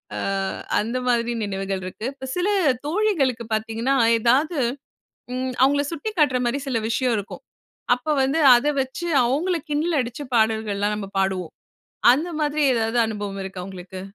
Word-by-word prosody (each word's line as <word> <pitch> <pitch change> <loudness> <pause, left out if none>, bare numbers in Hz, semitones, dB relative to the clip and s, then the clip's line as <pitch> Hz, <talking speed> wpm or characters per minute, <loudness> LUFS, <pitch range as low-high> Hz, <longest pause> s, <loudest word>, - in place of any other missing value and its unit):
ஆ - - -4 0.6
அந்த 230 +4 -2
மாதிரி 240 -1 +1
நினைவுகள் 195 -1 -3
இருக்கு. 185 +4 -7
இப்போ 265 -1 -9
சில 360 +2 +1 0.4
தோழிகளுக்கு 305 - +1
பார்த்தீங்கன்னா, 225 +4 -1 0.3
ஏதாவது, 275 +8 +2 0.8
ம் 255 0 -2
அவங்களை 285 +2 +4
சுட்டிக்காட்டுற 310 -6 +1
மாரி 255 +4 -1
சில 250 -4 0
விஷயம் 245 +1 +1
இருக்கும். 205 - -7 0.5
அப்ப 250 +5 -10
வந்து 270 +4 +1 0.2
அத 240 +4 -1
வச்சு 265 +6 -4 0.2
அவங்களை 325 +9 0
கிண்டல் 305 +2 +1
அடிச்சு 245 +4 -5
பாடல்கள்லாம் 220 -2 +1
நம்ம 205 -2 -5
பாடுவோம். 190 -3 -1 0.6
அந்த 300 +7 0
மாதிரி 300 0 0
ஏதாவது 225 +1 0
அனுபவம் 205 -2 -5
இருக்கா, 190 -1 -7
உங்களுக்கு? 185 -1 -9
245 Hz, 140 wpm, -23 LUFS, 210-290 Hz, 0.8 s, அவங்களை